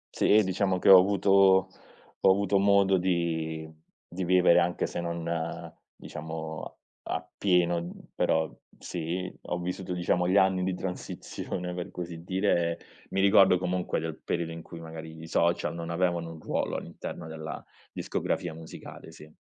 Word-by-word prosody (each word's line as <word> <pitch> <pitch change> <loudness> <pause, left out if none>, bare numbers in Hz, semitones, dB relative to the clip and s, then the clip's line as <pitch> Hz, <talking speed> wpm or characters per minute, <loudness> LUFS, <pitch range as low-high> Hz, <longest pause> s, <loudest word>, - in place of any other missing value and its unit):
Sì 110 +1 +5
diciamo 95 0 0
che - - +2
ho 95 -1 +11
avuto 100 0 +2 0.9
ho 95 - +5
avuto 100 0 +2
modo 100 -1 +4
di 80 -3 -1 0.4
di 90 +2 -5
vivere 90 -1 +5
anche 85 0 0
se 85 - -4
non 85 -1 -4 0.7
diciamo 80 0 -7 0.3
a - - -2
appieno, 90 -3 +1
uhm, 85 +1 -7
però 80 0 +1 0.3
sì 90 +2 -4
ho 90 - -3
vissuto 90 +1 -4
diciamo 90 0 +1
gli 95 +2 +3
anni 95 -1 +4
di 95 0 -1
transizione 90 -1 -5
per 90 -1 -5
così 85 -2 -7
dire. 90 -3 +1 0.3
Mi 95 - 0
ricordo 95 -2 +6
comunque 90 -1 -1
del 80 -1 -5
periodo 85 -1 -2
in 80 0 -7
cui 85 +1 -10
magari 80 -1 -9
i 80 - -8
social 85 +1 +1
non 85 0 -6
avevano 85 -1 0
un 80 - -11
ruolo - - -2
all'interno - - -7
della 80 -1 -7 0.3
discografia 85 - -2
musicale, 80 0 -10
sì. 75 0 -14
90 Hz, 150 wpm, -28 LUFS, 80-95 Hz, 0.9 s, ho